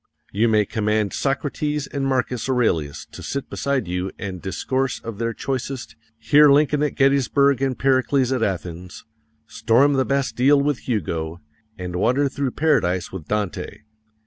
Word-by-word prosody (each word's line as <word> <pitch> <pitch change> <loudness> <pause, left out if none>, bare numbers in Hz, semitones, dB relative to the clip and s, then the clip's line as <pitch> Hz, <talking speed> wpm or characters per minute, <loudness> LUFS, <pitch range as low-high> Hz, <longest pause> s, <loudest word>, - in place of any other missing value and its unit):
You 110 +4 +2
may 110 -2 +3
command 105 -1 -1
Socrates 145 +1 -1
and 140 -1 -3
Marcus 125 -2 -1
Aurelius 85 - 0
to - - -10
sit 140 -1 -5
beside 140 -7 -1
you 90 +2 -2
and 95 -3 -6
discourse 130 +7 -2
of 115 -2 -8
their 115 0 -1
choicest, 130 +1 -4 0.2
hear 145 +4 +5
Lincoln 150 +1 +3
at 150 - 0
Gettysburg 140 0 +3
and 135 -2 0
Pericles 130 0 +2
at 130 -3 0
Athens, 90 -3 -4 0.4
storm 115 +5 +2
the 135 -1 +2
Bastile 140 0 +2
with 140 -2 -2
Hugo, 85 -6 -2 0.4
and 90 -2 -5
wander 135 +9 +2
through 140 0 -2
Paradise 110 - +1
with 90 -5 -8
Dante. 105 -2 -3
125 Hz, 145 wpm, -22 LUFS, 100-140 Hz, 0.4 s, hear